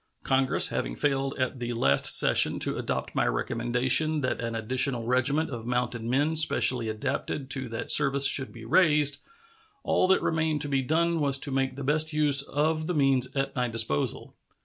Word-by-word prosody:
Congress 130 Hz, -1 st, +1 dB
having -, -, -4 dB
failed 135 Hz, -, -2 dB
at 130 Hz, 0 st, -3 dB
the 120 Hz, 0 st, -5 dB
last 70 Hz, -12 st, 0 dB
session -, -, +3 dB
to -, -, 0 dB
adopt -, -, -5 dB
my -, -, -1 dB
recommendation 125 Hz, -, 0 dB
that 130 Hz, -2 st, -3 dB
an 115 Hz, -1 st, -5 dB
additional 125 Hz, +2 st, -2 dB
regiment 130 Hz, +6 st, -1 dB
of 120 Hz, -2 st, -8 dB
mounted 125 Hz, -1 st, -3 dB
men 140 Hz, +7 st, -1 dB
specially 125 Hz, -6 st, +3 dB
adapted 130 Hz, +4 st, -5 dB
to 130 Hz, -3 st, -1 dB
that 115 Hz, -, -2 dB
service 140 Hz, -1 st, +5 dB
should 135 Hz, -1 st, +3 dB
be 115 Hz, -1 st, -13 dB
raised, 150 Hz, 0 st, +2 dB, 0.6 s
all -, -, 0 dB
that 190 Hz, -, +1 dB
remained 155 Hz, -1 st, -1 dB
to 145 Hz, -, +1 dB
be 135 Hz, -2 st, -1 dB
done 165 Hz, +4 st, -1 dB
was 140 Hz, -2 st, +3 dB
to 140 Hz, +1 st, -3 dB
make 135 Hz, -1 st, -2 dB
the 140 Hz, -, -8 dB
best 155 Hz, +3 st, +1 dB
use 145 Hz, -2 st, +3 dB
of 155 Hz, +3 st, -2 dB
the 180 Hz, -, -3 dB
means 135 Hz, -3 st, +1 dB
at 135 Hz, 0 st, -3 dB
my 125 Hz, -1 st, -1 dB
disposal. 110 Hz, -11 st, -2 dB
135 Hz, 180 wpm, -25 LUFS, 120-150 Hz, 0.6 s, service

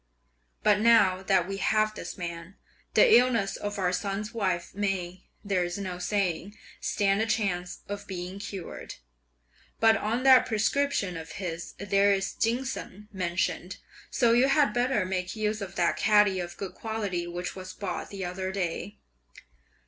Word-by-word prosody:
But 210 Hz, -1 st, +4 dB
now 210 Hz, -5 st, +5 dB
that 190 Hz, -2 st, +2 dB
we 195 Hz, 0 st, -4 dB
have 215 Hz, +1 st, +2 dB
this 215 Hz, -, -7 dB
man, 170 Hz, +1 st, -6 dB, 0.4 s
the 485 Hz, -, +7 dB
illness 235 Hz, -5 st, +2 dB
of 205 Hz, 0 st, -4 dB
our 180 Hz, -2 st, +1 dB
son's 205 Hz, +4 st, -3 dB
wife 185 Hz, -6 st, -1 dB
may, 190 Hz, -3 st, -3 dB, 0.2 s
there 190 Hz, -3 st, +1 dB
is 175 Hz, +1 st, -3 dB
no 185 Hz, -3 st, -5 dB
saying, 200 Hz, 0 st, -1 dB, 0.2 s
stand 200 Hz, 0 st, +1 dB
a 225 Hz, -, 0 dB
chance 180 Hz, -5 st, -1 dB
of 205 Hz, 0 st, -6 dB
being 185 Hz, 0 st, -5 dB
cured. 195 Hz, -3 st, -7 dB, 0.8 s
But 225 Hz, 0 st, +6 dB
on 225 Hz, +4 st, -1 dB
that 260 Hz, -1 st, +7 dB
prescription 220 Hz, -3 st, 0 dB
of 160 Hz, 0 st, -8 dB
his 175 Hz, -3 st, -5 dB
there 200 Hz, +1 st, +2 dB
is 195 Hz, 0 st, -1 dB
ginseng 230 Hz, -4 st, -3 dB
mentioned, 180 Hz, -1 st, -2 dB, 0.3 s
so 240 Hz, -3 st, +3 dB
you 245 Hz, +3 st, +5 dB
had 275 Hz, -5 st, +3 dB
better 245 Hz, -4 st, +1 dB
make 185 Hz, 0 st, -3 dB
use 215 Hz, 0 st, -1 dB
of 195 Hz, -1 st, -6 dB
that 175 Hz, -2 st, +1 dB
catty 210 Hz, -3 st, +4 dB
of 175 Hz, -1 st, -5 dB
good 195 Hz, -2 st, -5 dB
quality 205 Hz, -6 st, -3 dB
which 175 Hz, +1 st, -5 dB
was 185 Hz, 0 st, -7 dB
bought 190 Hz, -4 st, -4 dB
the 195 Hz, -2 st, -5 dB
other 185 Hz, +1 st, -3 dB
day." 190 Hz, +1 st, -3 dB
195 Hz, 155 wpm, -28 LUFS, 180-215 Hz, 0.8 s, the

